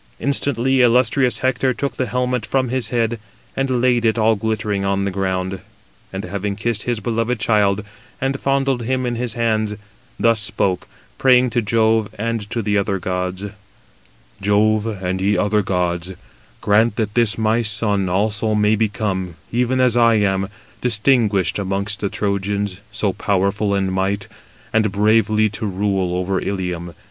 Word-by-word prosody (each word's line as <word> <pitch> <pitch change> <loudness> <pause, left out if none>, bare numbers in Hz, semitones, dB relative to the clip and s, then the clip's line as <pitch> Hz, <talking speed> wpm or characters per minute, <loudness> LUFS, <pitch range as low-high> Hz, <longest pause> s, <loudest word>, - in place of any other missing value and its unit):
Instantly 135 -2 +1
illustrious 125 0 +3
Hector 130 0 +1
took 140 - -3
the 130 - -1
helmet 125 -1 -1
from 130 0 0
his 130 0 -2
head, 115 -1 0 0.4
and 130 -2 0
laid 125 -2 +3
it 115 0 +2
all 110 0 +3
glittering 105 -1 -2
on 100 0 0
the 100 - -1
ground; 95 0 -2 0.5
and 95 +1 -5
having 100 +2 -3
kissed 110 0 -1
his 120 -1 -2
beloved 115 +2 -1
child, 105 -2 +2 0.4
and 135 +1 -1
fondled 135 -2 0
him 130 +2 -1
in 120 - -1
his 120 0 -2
hands, 110 -3 0 0.4
thus 115 -1 +3
spoke, 100 -3 -1 0.3
praying 125 -1 +4
to 120 - +1
Jove 110 0 +2
and 115 -1 -3
to 115 -1 -2
the 105 0 +1
other 100 0 -1
gods: 90 +1 -3 1.0
"Jove, 105 +2 +2
and 95 -3 -3
ye 100 +2 +2
other 105 +1 +2
gods, 90 -1 -1 0.5
grant 110 +2 +3
that 105 -2 -2
this 115 -2 +2
my 110 +1 +2
son 105 -4 0
also 105 +3 +1
may 105 +1 +3
become, 100 -4 -2 0.2
even 125 +2 +1
as 125 -2 +3
I 115 -1 +5
am, 95 -2 +1 0.3
distinguished 110 -6 +2
amongst 100 +1 -1
the 100 - -1
Trojans, 100 -1 -2
so 105 -3 0
powerful 100 +1 0
in 95 -1 0
might, 95 +1 -1 0.5
and 110 -2 +2
bravely 110 +1 +3
to 105 +1 -4
rule 95 -2 -1
over 95 +1 -1
Ilium. 90 -3 -4
105 Hz, 155 wpm, -20 LUFS, 100-115 Hz, 1.0 s, I